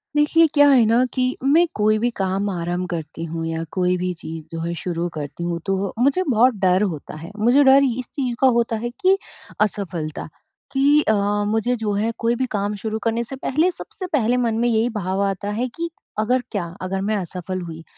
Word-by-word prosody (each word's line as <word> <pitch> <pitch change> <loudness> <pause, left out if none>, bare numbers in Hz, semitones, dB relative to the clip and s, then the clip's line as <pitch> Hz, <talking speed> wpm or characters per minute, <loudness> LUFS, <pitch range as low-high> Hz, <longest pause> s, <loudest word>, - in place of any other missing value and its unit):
देखिए, 310 +3 +5
क्या 290 -1 +6
है 255 -5 +6
ना 230 +3 +4
कि 255 0 0
मैं 315 +6 +5
कोई 215 +1 +3
भी 240 +2 +1
काम 195 +1 0
आरंभ 175 0 -2
करती 165 -1 -5
हूँ 165 0 -4
या 165 0 -3
कोई 180 -1 +1
भी 180 0 -2
चीज़ 160 0 -7
जो 165 - -5
है 170 +1 -2
शुरू 170 +1 -3
करती 145 +1 -6
हूँ 170 0 -2
तो 195 0 -1
मुझे 280 +9 +3
बहुत 245 +1 +4
डर 185 +1 +4
होता 150 - -9
है। 165 +4 -9
मुझे 245 +6 +4
डर 270 +1 +7
इस 255 - -5
चीज़ 255 -5 -2
का 265 - +5
होता 235 -1 +1
है 235 +2 -3
कि 380 +1 +4 0.4
असफलता 185 -7 -2 0.4
कि 285 +2 +4
अ, 220 - +2 0.3
मुझे 225 +3 +1
जो 220 -3 -2
है 215 +3 0
कोई 230 +1 +1
भी 260 +2 0
काम 205 0 -1
शुरू 220 +2 -4
करने 230 +1 0
से 255 +3 -6
पहले 305 +6 +1
सबसे 370 +1 -8
पहले 245 -3 +2
मन 235 -3 +1
में 240 - +2
यही 230 0 +2
भाव 195 -3 -2
आता 200 0 -2
है 235 +5 -1
कि 335 0 -3 0.3
अगर 250 +4 +2
क्या 200 -5 -1 0.2
अगर 190 +1 -2
मैं 210 +2 0
असफल 185 0 -4
हुई, 165 -2 -8
215 Hz, 210 wpm, -22 LUFS, 180-250 Hz, 0.4 s, डर